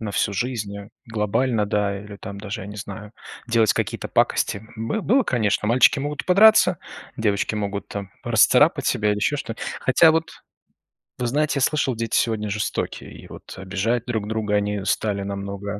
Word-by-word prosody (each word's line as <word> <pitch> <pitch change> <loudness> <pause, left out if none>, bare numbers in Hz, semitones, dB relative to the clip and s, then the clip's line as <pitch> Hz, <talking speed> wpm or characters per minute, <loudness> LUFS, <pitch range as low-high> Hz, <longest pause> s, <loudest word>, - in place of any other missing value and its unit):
на 110 -2 -4
всю 100 - 0
жизнь, 105 -2 -3
э, 100 0 -9 0.2
глобально, 115 +1 0
да, 100 -1 0
или 105 0 -10
там 100 0 -8
даже, 100 -1 -6
я - - -8
не 105 - -8
знаю, 105 +1 -8 0.3
делать 115 -3 +3
какие-то - - -3
пакости. 100 +2 0
Бы 115 - -2
было, 260 +8 +3
конечно. 110 - 0
Мальчики 125 +4 +5
могут 145 +1 -4
подраться, 190 -2 +6 0.4
девочки 105 -1 0
могут 100 -1 -3
там 100 -2 -6
расцарапать - - +4
себя 105 0 +1
или 105 - 0
ещё 145 +8 0
что. 115 -5 -5 0.3
Хотя 160 +5 +5
вот, 160 +1 -1 0.9
вы 125 - -1
знаете, 150 +4 +1
я - - 0
слышал, 135 -2 +1
дети 115 0 -2
сегодня 110 -2 0
жестокие, 105 +1 -3
и - - -12
вот - - -11
обижать 100 +6 -2
друг 110 -4 -3
друга 110 -1 -2
они 105 -1 -1
стали 100 -2 -1
намного 100 +1 -5
105 Hz, 175 wpm, -23 LUFS, 100-125 Hz, 0.9 s, подраться